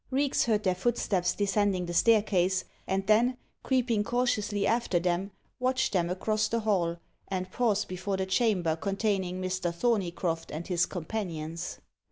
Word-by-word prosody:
Reeks 275 +1 +1
heard 215 -3 +1
their 185 -2 +2
footsteps 185 -3 0
descending 200 -2 +1
the 175 - -5
staircase, 190 -2 +3 0.2
and 195 0 0
then, 235 +5 +3 0.2
creeping 245 -5 +1
cautiously 210 -4 0
after 230 -5 +1
them, 175 +2 0 0.3
watched 255 -1 +1
them 175 -3 +1
across 215 +4 0
the 230 0 -1
hall, 180 -6 +1 0.3
and 185 -1 -3
pause 215 -3 +1
before 190 +2 -3
the 190 - -1
chamber 190 -5 +1
containing 195 0 -1
Mr. 185 -1 -1
Thorneycroft 170 -5 -1
and 160 +3 -5
his 175 -2 +1
companions. 170 -3 -5
195 Hz, 145 wpm, -29 LUFS, 180-220 Hz, 0.3 s, staircase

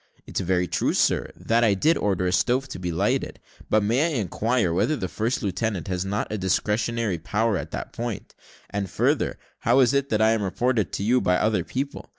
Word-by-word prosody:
"It's - - -3
very 90 -1 +1
true, 80 -2 0
sir, - - +1
that 115 +1 +1
I 105 -4 +4
did 155 - +3
order 95 -3 0
a 90 - +1
stove 125 +7 +1
to 110 - -6
be 90 -1 -3
lighted; 80 - -1 0.3
but 110 -1 +3
may 120 +7 +2
I 150 -7 -1
inquire 105 -1 0
whether 150 - +1
the 95 -9 -3
first 115 +7 -2
lieutenant 100 -2 -2
has 90 -1 -1
not 100 +3 -2
a 110 - -2
discretionary 105 +1 0
power 105 +6 0
in - - -3
that - - -6
point? 120 -3 -5 0.4
and 100 -2 -2
further, - - 0 0.2
how 120 +4 +3
is 130 0 +4
it 140 0 +1
that 110 - +1
I 110 +1 +4
am 115 -1 +1
reported 105 - 0
to - - -2
you 125 +4 +3
by 90 - +2
other 105 -5 +1
people? 140 - -5
110 Hz, 210 wpm, -24 LUFS, 95-120 Hz, 0.4 s, I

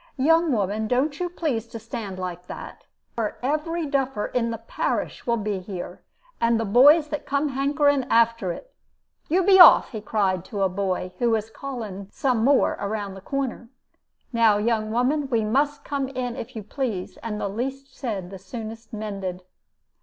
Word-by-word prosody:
'Young 325 +4 +4
woman, 215 -1 0
don't 280 +5 0
you 355 -1 -1
please 280 -10 -2
to 230 - -8
stand 220 -3 -6
like 180 -1 -5
that, - - -9 0.3
or 220 -3 -2
every 310 +4 -1
duffer 270 -6 -1
in 235 -2 -1
the 230 - -3
parish 230 +2 -3
will 235 0 +2
be 210 -2 -2
here, 185 -1 -7 0.4
and 230 0 +3
the 225 - -1
boys 290 +9 +6
that 300 - -4
come 285 +2 +1
hankering 280 0 +2
after 230 -6 +2
it. - - -9 0.6
You 365 +4 +3
be 380 0 +6
off!' 355 - +9
he 220 -4 -5
cried 200 -3 +1
out 175 - -15
to 205 -4 -2
a 190 - +3
boy 185 -1 -2
who 240 - +2
was 220 -1 0
calling 220 -8 -6
some 250 -4 0
more 275 +2 +3
round 200 -1 -3
the 190 - -10
corner. 260 -1 -3 0.6
'Now, 225 -3 +4
young 215 0 0
woman, 265 +5 +1
we 230 -4 +1
must 285 +7 0
come 280 -2 -2
in 250 -2 -4
if 250 +3 -7
you 220 - -5
please, 215 -4 -4
and 210 -2 -5
the - - -1
least 265 +6 -5
said 200 -8 -4
the 195 - -8
soonest 225 +4 -8
mended.' 195 -4 -5
230 Hz, 180 wpm, -24 LUFS, 205-275 Hz, 0.6 s, off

